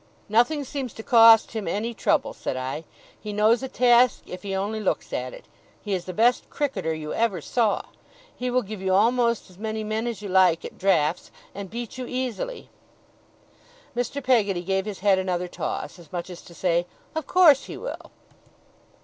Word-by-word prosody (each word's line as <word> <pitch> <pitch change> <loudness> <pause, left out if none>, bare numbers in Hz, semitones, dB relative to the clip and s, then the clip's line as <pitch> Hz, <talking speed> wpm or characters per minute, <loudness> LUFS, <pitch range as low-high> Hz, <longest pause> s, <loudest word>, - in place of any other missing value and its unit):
'Nothing 245 +8 +2
seems 265 -3 -5
to 220 - -8
cost 225 -1 +7
him 220 -5 -4
any 215 +7 -2
trouble,' - - +1
said 130 - -4
I. 130 +5 -4 0.3
'He 210 - -6
knows 215 +3 +3
a 265 - -3
task 245 -1 +4
if 180 - -8
he 195 0 -4
only 205 +3 -2
looks 215 - -2
at - - -3
it. - - -12 0.3
He 205 - -4
is 180 -2 -2
the 185 - -5
best 240 +6 +2
cricketer 225 - -2
you 155 -1 -4
ever 225 -6 0
saw. 220 - 0 0.5
He 250 0 -3
will 250 0 +1
give 205 -1 -7
you 190 -1 +1
almost 235 +2 +2
as 180 - -19
many 220 0 -3
men 215 +2 -2
as 225 -3 -5
you - - -4
like 185 -3 +3
at - - -9
draughts, 175 -4 +1 0.2
and 200 -1 -7
beat 235 +3 -6
you 250 - -4
easily.' 260 - -4 1.3
Mr. 245 +3 -2
Peggotty 205 -8 +2
gave 190 +1 0
his 205 -3 -6
head 195 -2 +4
another 180 -1 -1
toss, 175 - -5
as 165 -4 -16
much 175 +1 -5
as 175 - -9
to 170 - -14
say: 175 -1 +1 0.3
'Of 315 -3 -4
course 325 -7 +6
he - - -8
will. - - -7
215 Hz, 190 wpm, -25 LUFS, 185-245 Hz, 1.3 s, cost